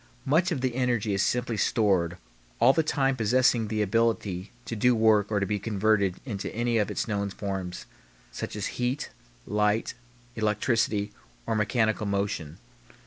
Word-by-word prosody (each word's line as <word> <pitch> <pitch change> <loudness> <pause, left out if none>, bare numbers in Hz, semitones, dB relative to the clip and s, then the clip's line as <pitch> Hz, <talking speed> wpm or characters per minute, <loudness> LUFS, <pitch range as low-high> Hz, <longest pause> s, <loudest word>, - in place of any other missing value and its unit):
Much 165 +7 +2
of 145 -6 -1
the 130 -2 0
energy 120 -4 0
is 100 - +1
simply 120 +1 0
stored 95 -5 +1 0.4
all 120 +3 +6
the 160 - +3
time 135 -3 +1
possessing 120 0 +2
the 105 0 0
ability 105 -3 0
to 115 - -4
do 125 +3 +3
work 110 -2 +4
or 105 - +2
to 100 - 0
be 105 +1 -1
converted 100 -2 +1
into 105 -7 -4
any 120 0 +1
of 105 - 0
its - - -2
known 100 -2 -1
forms, 95 -3 -5 0.5
such - - -5
as 105 - -3 0.2
heat, 125 +4 -1 0.3
light, 105 +2 +1 0.4
electricity, 105 -1 0 0.3
or - - -1
mechanical 110 0 +1
motion. 100 -6 -2
110 Hz, 155 wpm, -27 LUFS, 100-120 Hz, 0.5 s, all